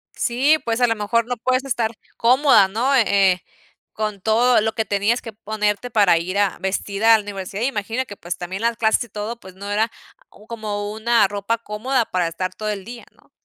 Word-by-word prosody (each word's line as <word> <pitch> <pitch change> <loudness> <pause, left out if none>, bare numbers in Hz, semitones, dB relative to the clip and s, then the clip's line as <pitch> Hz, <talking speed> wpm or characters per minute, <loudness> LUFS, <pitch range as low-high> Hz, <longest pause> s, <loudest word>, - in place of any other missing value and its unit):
Sí, 265 +5 +2
pues 230 +1 -1
a 245 - +5
lo 225 - +1
mejor 225 +2 0
no 245 0 -3
puedes 255 +3 0
estar 235 -4 -1 0.2
cómoda, 250 -4 +5
¿no? 240 +8 +1
Eh 240 -4 +4 0.3
eh, 180 -1 -3 0.5
con 210 -2 -3
todo 230 +3 +3
lo 220 +1 -1
que 220 0 -1
tenías 205 +4 0
que 225 - -8
ponerte 215 +1 -2
para 205 -7 +4
ir 185 +4 -4
a 200 -2 +1
vestida 200 +3 +2
a - - +4
la 215 - -6
universidad. 200 +1 -5
Imagino 240 0 -2
que, 205 - -10
pues, 175 -2 -6
también 185 +3 -6
las 230 0 0
clases, 220 +1 +2
y - - -19
todo, 215 +3 -5
pues, 185 -3 -13
no 200 +1 -7
era 220 +3 +1 0.4
o 210 - -18
como 210 -2 -4
una 220 -1 +3
ropa 205 +3 -2
cómoda 230 +3 -1
para 180 -4 -1
estar 185 +3 -4
todo 215 +3 -4
el 200 -3 -4
día, 235 +1 -9
¿no? - - -28
220 Hz, 215 wpm, -21 LUFS, 200-235 Hz, 0.5 s, a